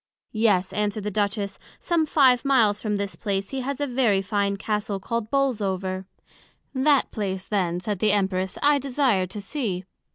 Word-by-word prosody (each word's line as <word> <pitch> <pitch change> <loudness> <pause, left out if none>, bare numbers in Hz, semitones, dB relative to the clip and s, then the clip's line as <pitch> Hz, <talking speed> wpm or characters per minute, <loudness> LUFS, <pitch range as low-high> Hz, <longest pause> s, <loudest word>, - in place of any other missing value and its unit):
Yes, 210 -5 +2
answered 210 0 -1
the 210 - -2
Duchess, 200 0 -1 0.2
some 335 -3 0
five 260 -5 +4
miles 230 -7 +3
from 210 -2 -1
this 200 -1 -3
place 195 -2 -3
he 270 -1 -2
has 275 +2 -3
a 290 - 0
very 240 -7 +2
fine 200 0 0
Castle 210 0 -2
called 225 +2 -3
Bolesover. 195 -8 -1 0.7
That 275 +1 +3
place, 190 -3 -3
then, 180 -4 0
said 205 0 -3
the 215 +1 +3
Empress, 190 -2 0
I 290 0 +5
desire 255 -8 +1
to 190 +3 -7
see. 200 -5 -3
210 Hz, 165 wpm, -25 LUFS, 195-255 Hz, 0.7 s, I